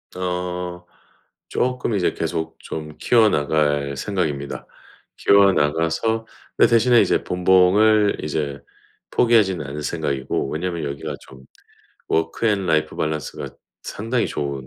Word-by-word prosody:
어. 90 -1 -4 0.6
쪼끔 125 -3 -1
이제 95 -3 +1
계속 80 0 -3
좀 75 -1 -7
키워 115 -3 +4
나갈 75 -4 0
생각입니다. 75 -6 -3 0.5
키워 100 -1 +5
나가서 80 +9 0 0.3
근데 - - +5
대신에 120 +1 +5
이제 - - +2
본봉을 95 +4 +3
이제 70 -2 -3 0.5
포기하지는 105 -7 +3
않을 75 +2 -6
생각이고 70 -4 -2
왜냐하면 85 +1 -3
여기가 70 0 -5
좀 65 0 -15 0.6
워크 80 +8 0
앤 100 -3 +1
라이프 80 -2 0
밸런스가 75 -1 -3 0.3
상당히 115 +3 -2
좋은 70 -2 -4
85 Hz, 280 characters per minute, -21 LUFS, 75-100 Hz, 0.6 s, 키워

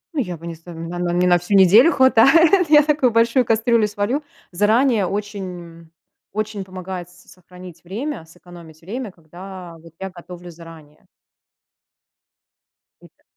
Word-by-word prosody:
Ну, - - -1
я 180 -6 -5
бы 170 - -13
не 170 - -6
з 165 - -23
на 175 - -8 0.3
на 175 -1 -2
мне 180 +1 +1
на 175 0 +4
всю 195 +3 +1
неделю 215 - +6
хватает, 305 - +4
я 300 -1 +6
такую 290 -5 +1
большую 230 +2 +2
кастрюлю 225 -1 +2
сварю. 210 +8 -2 0.3
Заранее 215 +2 +2
очень 205 0 -5
м, 170 -2 -11 0.4
очень 215 -1 -4
помогает 185 -1 -8
с 180 0 -20
сохранить 180 -1 -14
время, 225 - -6
сэкономить 170 -1 -16
время, 225 +3 -6
когда 175 +1 -12
вот 165 0 -17
я 190 -1 -6
готовлю 175 0 -12
заранее. 160 -2 -15 2.0
И - - -16
та - - -37
190 Hz, 155 wpm, -20 LUFS, 175-230 Hz, 2.0 s, неделю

